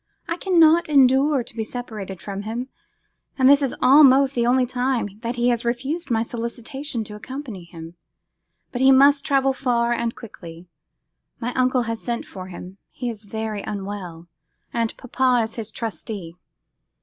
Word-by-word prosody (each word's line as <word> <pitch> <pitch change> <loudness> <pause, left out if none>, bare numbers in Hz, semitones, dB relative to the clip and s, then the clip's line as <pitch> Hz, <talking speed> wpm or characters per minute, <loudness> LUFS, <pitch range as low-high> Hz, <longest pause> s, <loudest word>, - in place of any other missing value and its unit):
I 335 - -1
cannot 340 -3 +4
endure 270 0 +4
to 230 - -11
be 225 - -2
separated 215 -5 -7
from 200 -1 -5
him, 235 +5 -5 0.7
and 260 -2 +4
this 285 +1 +6
is 270 -3 -1
almost 275 0 +6
the 235 -2 +1
only 255 +1 +3
time 245 -5 -2
that 235 +1 -4
he 240 0 +2
has 235 -1 0
refused 270 +7 -2
my 225 -2 +1
solicitation 235 +3 -5
to 210 - -10
accompany 230 -5 -8
him. 165 -1 -10 0.8
But 245 - -3
he 265 0 +7
must 280 +1 +6
travel 270 -2 +2
far 240 -2 +1
and 235 -1 -2
quickly. 175 -6 -11 0.7
My 245 +2 -3
uncle 255 -1 +2
has 230 -1 -4
sent 235 -1 -3
for 185 -1 -9
him; 185 +1 -10
he 245 -2 -4
is 215 -2 -11
very 220 0 -4
unwell, 190 -5 -6 0.5
and 230 -1 -1
papa 255 -1 +1
is 220 0 -5
his 225 -2 -5
trustee. 210 -6 -6
235 Hz, 160 wpm, -22 LUFS, 215-265 Hz, 0.8 s, he